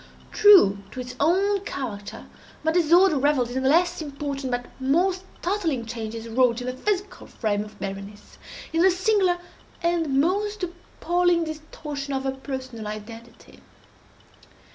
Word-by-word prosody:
True 385 - +7
to 255 - -9
its 250 0 -6
own 395 +4 +3
character, 240 - -6 0.4
my 320 - +2
disorder 345 -1 +4
revelled 265 -4 +2
in 260 +1 -2
the 265 - +2
less 345 +3 +3
important 280 -2 -4
but 245 0 -2
more 330 +9 +2
startling 360 - -3
changes 225 0 -6
wrought 235 0 +2
in 245 - -6
the 255 - -2
physical 400 +8 -3
frame 210 -2 -1
of 210 0 -13
Berenice—in 200 - -6
the 380 - +6
singular 375 -1 +2 0.5
and 330 -5 +1
most 405 +6 0
appalling 350 0 0
distortion 300 -3 -6
of 265 - -2
her 270 - 0
personal 260 -4 -6
identity. 225 +2 -10
280 Hz, 135 wpm, -24 LUFS, 240-355 Hz, 0.5 s, True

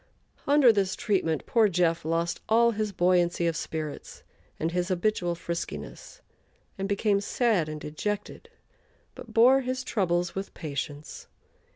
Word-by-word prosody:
Under 280 -5 +6
this 195 -2 0
treatment 165 -7 -1
poor 225 -3 +3
"Jeff" 170 -2 +1
lost 165 +2 -1
all 235 +1 +5
his 215 -1 -2
buoyancy 175 -2 +2
of 165 -1 0
spirits 155 -1 -6 0.4
and 165 +1 -1
his 180 0 -1
habitual 180 -1 0
friskiness, 170 - -6 0.5
and 195 0 -4
became 200 0 +1
sad 205 -7 +1
and 155 0 -5
dejected, 205 - -5 0.6
but 230 - -11
bore 250 +4 +5
his 255 0 -3
troubles 175 -6 0
with 195 +1 -6
patience. 145 -1 -6
185 Hz, 135 wpm, -27 LUFS, 170-215 Hz, 0.6 s, Under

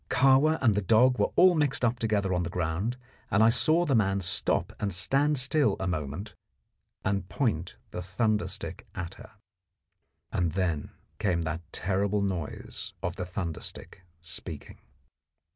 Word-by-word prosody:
Kahwa 135 +4 +4
and 115 -4 +5
the 105 - 0
dog 120 +6 +4
were - - +3
all 185 0 +7
mixed 145 -6 +1
up 120 +1 0
together 105 -4 0
on 90 - +1
the 85 - -2
ground, 90 +8 -2 0.3
and 105 +2 +4
I 110 - +7
saw 155 +8 +3
the 145 - +1
man 100 -4 +2
stop 90 0 +1
and 105 -1 -1
stand 140 - +2
still 130 -3 +3
a 95 - -2
moment 90 +3 -3 0.7
and 95 -1 -1
point 100 - -1 0.2
the 90 - -4
thunder 105 +4 0
stick - - -7
at 95 -1 -5
her. - - -12 1.0
And 85 -3 0
then 90 -6 -1 0.3
came 90 -5 +1
that 80 +1 -3
terrible 100 +2 0
noise 90 -6 -4
of 90 0 -2
the 90 -3 -4
thunder 90 -3 -4
stick - - -7 0.2
speaking. 80 -2 -8
100 Hz, 160 wpm, -28 LUFS, 90-120 Hz, 1.0 s, all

